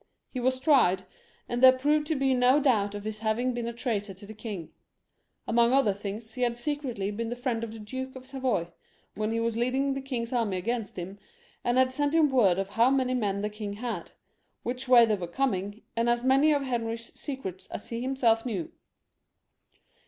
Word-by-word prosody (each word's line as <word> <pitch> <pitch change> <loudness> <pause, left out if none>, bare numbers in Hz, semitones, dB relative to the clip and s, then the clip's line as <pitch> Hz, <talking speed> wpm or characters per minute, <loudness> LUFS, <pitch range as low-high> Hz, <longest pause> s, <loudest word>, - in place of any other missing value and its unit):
He 255 - -4
was 255 +1 +1
tried, 255 - +4 0.4
and 240 0 -2
there 260 0 +8
proved 295 +3 +2
to 320 - 0
be 270 -1 +2
no 250 +3 +5
doubt 210 -8 +2
of 205 - -6
his 215 0 -5
having 230 +3 0
been 240 -1 -3
a - - -2
traitor 215 -5 -3
to 200 +2 -12
the 215 - -9
king; 210 -6 -7 0.8
among 235 +1 +4
other 270 -7 +4
things, 205 +3 -6
he 250 - -6
had 240 -1 +1
secretly 245 -7 -3
been 225 +2 -3
the 240 - -3
friend 245 -2 -2
of 230 - -4
the 225 - -9
Duke 260 +5 -6
of 260 0 -10
Savoy, 255 -10 -1 0.4
when 215 +1 -2
he 230 - 0
was 230 -1 0
leading 260 +4 +1
the 270 - -4
king's 250 -3 -4
army 225 -6 0
against 225 +1 -3
him, 190 +3 -6 0.4
and 245 +1 +1
had 260 0 +4
sent 290 +3 0
him 315 -3 +5
word 205 -9 +4
of 195 0 -2
how 230 +4 +4
many 260 -2 +1
men 205 -5 -1
the - - +1
king 210 -1 -5
had, 235 +3 -5 0.5
which 255 +2 -3
way 245 -2 +8
they 220 - +1
were 185 -4 -2
coming, 205 -1 -2
and 230 +1 +1
as 240 0 +1
many 270 +4 +4
of 285 -2 +2
Henry's 230 -2 -3
secrets 190 - -6
as - - -8
he 230 0 -3
himself 245 -4 +2
knew. 200 -10 -3
235 Hz, 205 wpm, -28 LUFS, 210-260 Hz, 0.8 s, there